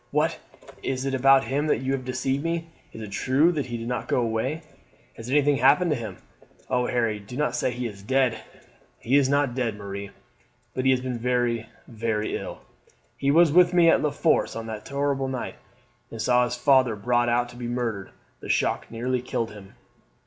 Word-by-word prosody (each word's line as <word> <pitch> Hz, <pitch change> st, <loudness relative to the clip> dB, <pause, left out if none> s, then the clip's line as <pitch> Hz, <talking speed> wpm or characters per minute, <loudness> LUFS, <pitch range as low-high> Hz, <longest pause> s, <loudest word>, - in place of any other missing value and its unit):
"What, -, -, 0 dB, 0.4 s
is 130 Hz, 0 st, -2 dB
it 135 Hz, -, -1 dB
about 135 Hz, +1 st, +5 dB
him 145 Hz, +3 st, -1 dB
that 140 Hz, -, +1 dB
you 135 Hz, +1 st, 0 dB
deceived 130 Hz, +2 st, -2 dB
me! 165 Hz, 0 st, -2 dB, 0.2 s
Is 110 Hz, -, -8 dB
it 105 Hz, -, -8 dB
true 135 Hz, -, +3 dB
that 145 Hz, -6 st, -2 dB
he 120 Hz, -1 st, -4 dB
did 115 Hz, 0 st, -6 dB
not 125 Hz, 0 st, -3 dB
go -, -, +1 dB
away? 120 Hz, +8 st, -2 dB, 0.5 s
Has 115 Hz, +1 st, -9 dB
anything 145 Hz, 0 st, +3 dB
happened 145 Hz, +7 st, +4 dB
to -, -, +2 dB
him? 110 Hz, -7 st, -6 dB, 0.5 s
Oh, 125 Hz, -1 st, +1 dB
Harry, 115 Hz, -3 st, 0 dB
do 105 Hz, +5 st, -9 dB
not 150 Hz, +1 st, 0 dB
say -, -, 0 dB
he 125 Hz, 0 st, -4 dB
is 100 Hz, -4 st, -6 dB
dead!" 130 Hz, +2 st, +1 dB, 0.6 s
"He 125 Hz, +4 st, 0 dB
is 140 Hz, -2 st, +4 dB
not 140 Hz, -3 st, +2 dB
dead, 120 Hz, -4 st, -1 dB
Marie, 100 Hz, 0 st, -6 dB, 0.6 s
but 130 Hz, -, -2 dB
he -, -, +5 dB
has 130 Hz, -1 st, +3 dB
been 125 Hz, -2 st, -4 dB
very, 120 Hz, -2 st, 0 dB, 0.2 s
very 110 Hz, -2 st, -2 dB
ill. -, -, -6 dB, 0.5 s
He 140 Hz, -, -1 dB
was 165 Hz, +2 st, +5 dB
with 180 Hz, +2 st, +5 dB
me 170 Hz, -2 st, +6 dB
at -, -, +3 dB
La 150 Hz, -, +1 dB
Force 160 Hz, +2 st, +1 dB
on 115 Hz, 0 st, -5 dB
that 110 Hz, -1 st, -7 dB
terrible 140 Hz, -1 st, -1 dB
night, 130 Hz, -2 st, -4 dB, 0.5 s
and 115 Hz, -, -9 dB
saw 125 Hz, +2 st, +3 dB
his 120 Hz, 0 st, -3 dB
father 130 Hz, -2 st, +3 dB
brought 120 Hz, +3 st, +1 dB
out 120 Hz, +1 st, +1 dB
to 120 Hz, -, -13 dB
be 120 Hz, -1 st, -5 dB
murdered. 115 Hz, -5 st, -3 dB, 0.3 s
The -, -, -10 dB
shock -, -, 0 dB
nearly 125 Hz, +2 st, -2 dB
killed 115 Hz, -2 st, -3 dB
him. 100 Hz, -2 st, -13 dB
125 Hz, 200 wpm, -25 LUFS, 115-135 Hz, 0.6 s, me